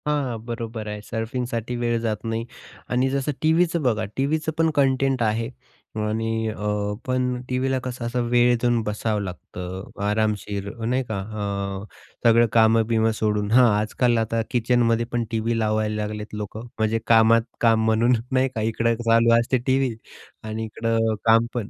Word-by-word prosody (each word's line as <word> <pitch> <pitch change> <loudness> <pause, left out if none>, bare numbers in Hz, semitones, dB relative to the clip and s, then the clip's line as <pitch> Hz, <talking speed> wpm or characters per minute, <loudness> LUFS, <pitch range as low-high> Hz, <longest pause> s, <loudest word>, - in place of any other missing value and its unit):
हां, 150 -1 +1
हां 120 -3 -3
बरोबर 115 -2 -5
आहे 105 0 -5
सर्फिंगसाठी 120 +1 -3
वेळ 120 -1 0
जात 110 -3 -2
नाही 115 0 -2 0.4
आणि 125 +2 +1
जसं 140 +2 -1
टीव्हीचं 165 +2 +2
बघा, 110 -5 +1
टीव्हीचं 155 +4 0
पण 165 0 +3
कंटेंट 135 -2 +2
आहे 115 +1 0 0.5
आणि 110 +1 -1
अ, 105 -1 -2
पण 125 -1 -1
टीव्हीला 130 +1 0
कसं 125 -1 -5
असं 120 +1 -1
वेळ 120 0 +4
देऊन 120 -1 +2
बसावं 105 0 -1
लागतं 90 0 -7
आरामशीर 105 -1 -1 0.2
नाही 125 +3 +1
का. 105 -3 -2 0.6
अ, - - -8 0.4
सगळं 115 +1 +5
काम-बीम 115 0 +4
सोडून 105 -1 0
हां, 125 +1 +6
आजकाल 120 +3 +1
आता 115 0 0
किचनमध्ये 120 -1 +2
पण 120 -1 0
टीव्ही 115 +1 0
लावायला 110 -1 0
लागलेत 105 0 -6
लोकं 105 +2 -6
म्हणजे 110 +1 +1
कामात 115 0 +6 0.2
काम 115 -1 +4
म्हणून 115 +3 +3 0.2
नाही 130 0 +2
का 110 - -1
इकडं 115 +1 +1
चालू 115 0 +5
असते 120 +2 +1
टीव्ही 130 -3 +1 0.5
आणि 110 +1 -4
इकडं 115 0 0
काम 115 +1 +5
पण. 115 -4 -3
115 Hz, 155 wpm, -23 LUFS, 110-125 Hz, 0.6 s, हां